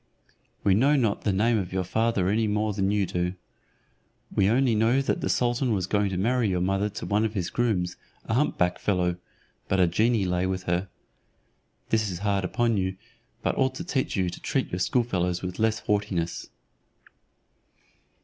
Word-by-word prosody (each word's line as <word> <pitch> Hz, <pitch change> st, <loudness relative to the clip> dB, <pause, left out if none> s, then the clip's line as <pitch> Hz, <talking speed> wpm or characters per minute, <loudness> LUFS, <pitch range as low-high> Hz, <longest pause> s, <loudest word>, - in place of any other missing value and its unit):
We 100 Hz, -, +4 dB
know 135 Hz, +9 st, +4 dB
not 115 Hz, -7 st, 0 dB
the 105 Hz, -, +3 dB
name 110 Hz, +4 st, +2 dB
of 90 Hz, -3 st, -4 dB
your 95 Hz, 0 st, -1 dB
father 110 Hz, 0 st, 0 dB
any 110 Hz, +3 st, +2 dB
more 105 Hz, 0 st, 0 dB
than 95 Hz, -1 st, 0 dB
you 100 Hz, -1 st, +1 dB
do. 90 Hz, +1 st, -2 dB, 1.0 s
We 95 Hz, 0 st, +3 dB
only 125 Hz, +1 st, +3 dB
know 115 Hz, +4 st, +3 dB
that 135 Hz, -, -1 dB
the -, -, -1 dB
sultan 120 Hz, 0 st, +1 dB
was 95 Hz, -4 st, 0 dB
going 100 Hz, +1 st, +1 dB
to 95 Hz, -, -3 dB
marry 115 Hz, +3 st, +1 dB
your 90 Hz, -1 st, 0 dB
mother 95 Hz, +3 st, 0 dB
to 105 Hz, -, -7 dB
one 105 Hz, +1 st, +1 dB
of 110 Hz, 0 st, -2 dB
his 90 Hz, -3 st, -2 dB
grooms, 95 Hz, -8 st, 0 dB, 0.3 s
a -, -, -2 dB
humpback 100 Hz, -9 st, +1 dB
fellow; 90 Hz, -3 st, 0 dB, 0.5 s
but 95 Hz, -, +1 dB
a 90 Hz, -, +6 dB
genie 105 Hz, +4 st, +2 dB
lay 90 Hz, 0 st, 0 dB
with 95 Hz, 0 st, -2 dB
her. 90 Hz, +2 st, -1 dB, 1.0 s
This 110 Hz, -2 st, +1 dB
is 90 Hz, -, -4 dB
hard 100 Hz, -1 st, +1 dB
upon 115 Hz, +4 st, +1 dB
you, 95 Hz, 0 st, -1 dB, 0.5 s
but -, -, 0 dB
ought 130 Hz, 0 st, +2 dB
to 165 Hz, -, -5 dB
teach 145 Hz, -7 st, -1 dB
you 90 Hz, -3 st, 0 dB
to -, -, -9 dB
treat -, -, -1 dB
your 90 Hz, -, -2 dB
schoolfellows 90 Hz, -6 st, 0 dB
with 90 Hz, +2 st, -5 dB
less 110 Hz, 0 st, +1 dB
haughtiness." 100 Hz, -5 st, -1 dB
100 Hz, 185 wpm, -26 LUFS, 90-115 Hz, 1.0 s, a